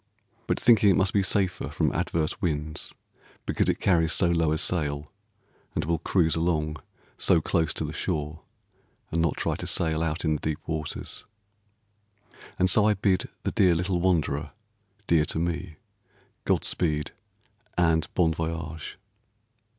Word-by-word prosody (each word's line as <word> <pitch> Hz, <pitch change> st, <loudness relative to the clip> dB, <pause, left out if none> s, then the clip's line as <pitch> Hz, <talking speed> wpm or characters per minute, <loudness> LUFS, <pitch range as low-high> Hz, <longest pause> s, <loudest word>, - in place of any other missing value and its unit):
But -, -, 0 dB
thinking 110 Hz, -3 st, +5 dB
it 95 Hz, -, +5 dB
must 95 Hz, 0 st, +2 dB
be 100 Hz, -, +3 dB
safer 95 Hz, -1 st, 0 dB
from -, -, 0 dB
adverse 80 Hz, -2 st, -1 dB
winds 75 Hz, -2 st, -2 dB, 0.5 s
because -, -, +1 dB
it -, -, 0 dB
carries 80 Hz, -4 st, +3 dB
so 85 Hz, 0 st, +3 dB
low 80 Hz, -2 st, +2 dB
a 80 Hz, -, +1 dB
sail, 75 Hz, -4 st, -1 dB, 0.6 s
and 80 Hz, -, -1 dB
will 85 Hz, 0 st, 0 dB
cruise 85 Hz, -1 st, +2 dB
along 80 Hz, -2 st, 0 dB, 0.4 s
so -, -, +4 dB
close 80 Hz, -1 st, 0 dB
to -, -, -1 dB
the -, -, -5 dB
shore 75 Hz, +1 st, -3 dB, 0.7 s
and 80 Hz, -, +1 dB
not 80 Hz, -3 st, 0 dB
try -, -, 0 dB
to -, -, -5 dB
sail 80 Hz, -2 st, 0 dB
out 80 Hz, +1 st, -2 dB
in 80 Hz, -, +2 dB
the 75 Hz, -, -3 dB
deep 80 Hz, -1 st, -1 dB
waters. 80 Hz, -2 st, -5 dB, 1.3 s
And 90 Hz, -, +3 dB
so 105 Hz, +3 st, +4 dB
I 105 Hz, -, +3 dB
bid 95 Hz, -2 st, +1 dB
the -, -, -1 dB
dear 90 Hz, -3 st, +4 dB
little 90 Hz, +1 st, 0 dB
wanderer 80 Hz, -5 st, 0 dB, 0.5 s
(dear 80 Hz, -4 st, +3 dB
to -, -, -2 dB
me), 85 Hz, 0 st, -2 dB, 0.7 s
God -, -, +2 dB
speed, 75 Hz, -4 st, 0 dB, 0.7 s
and 80 Hz, -2 st, +2 dB
bon 85 Hz, -3 st, +3 dB
voyage. 80 Hz, -1 st, -5 dB
80 Hz, 155 wpm, -26 LUFS, 75-90 Hz, 1.3 s, thinking